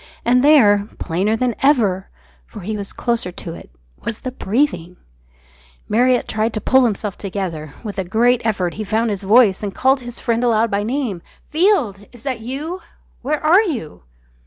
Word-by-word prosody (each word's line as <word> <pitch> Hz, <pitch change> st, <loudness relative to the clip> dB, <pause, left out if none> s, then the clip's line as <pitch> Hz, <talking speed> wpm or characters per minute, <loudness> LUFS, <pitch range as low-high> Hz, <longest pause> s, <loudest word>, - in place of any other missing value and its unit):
And 250 Hz, +2 st, +4 dB
there, 210 Hz, -9 st, +5 dB
plainer 190 Hz, +6 st, 0 dB
than 245 Hz, +1 st, 0 dB
ever 215 Hz, -10 st, +2 dB, 0.4 s
for 65 Hz, -, -10 dB
he 215 Hz, +4 st, -4 dB
was 200 Hz, -1 st, -5 dB
closer 235 Hz, -7 st, -2 dB
to 170 Hz, -2 st, -7 dB
it -, -, -12 dB, 0.3 s
was 230 Hz, -1 st, -4 dB
the 255 Hz, -, -4 dB
breathing! 195 Hz, -, -1 dB, 0.9 s
Marriott 245 Hz, +3 st, +2 dB
tried 220 Hz, +1 st, -1 dB
to -, -, 0 dB
pull 260 Hz, +3 st, +4 dB
himself 210 Hz, -3 st, -2 dB
together. 180 Hz, -7 st, -5 dB
With 205 Hz, -3 st, -5 dB
a -, -, 0 dB
great 235 Hz, +6 st, +2 dB
effort 195 Hz, -6 st, -1 dB
he 215 Hz, -, -5 dB
found 220 Hz, +2 st, 0 dB
his 200 Hz, -, -3 dB
voice 205 Hz, -1 st, +4 dB
and 200 Hz, -2 st, -4 dB
called 265 Hz, +1 st, +3 dB
his 245 Hz, -1 st, -8 dB
friend 235 Hz, -1 st, 0 dB
aloud 230 Hz, -2 st, +2 dB
by 200 Hz, 0 st, +1 dB
name! 225 Hz, -5 st, -2 dB, 0.3 s
"Field! 295 Hz, -, +1 dB
Is 240 Hz, -1 st, -15 dB
that 260 Hz, -4 st, -3 dB
you? 290 Hz, +10 st, -5 dB, 0.4 s
Where 300 Hz, +4 st, -2 dB
are 350 Hz, +6 st, +6 dB
you?" 260 Hz, -, -4 dB
225 Hz, 175 wpm, -19 LUFS, 200-255 Hz, 0.9 s, are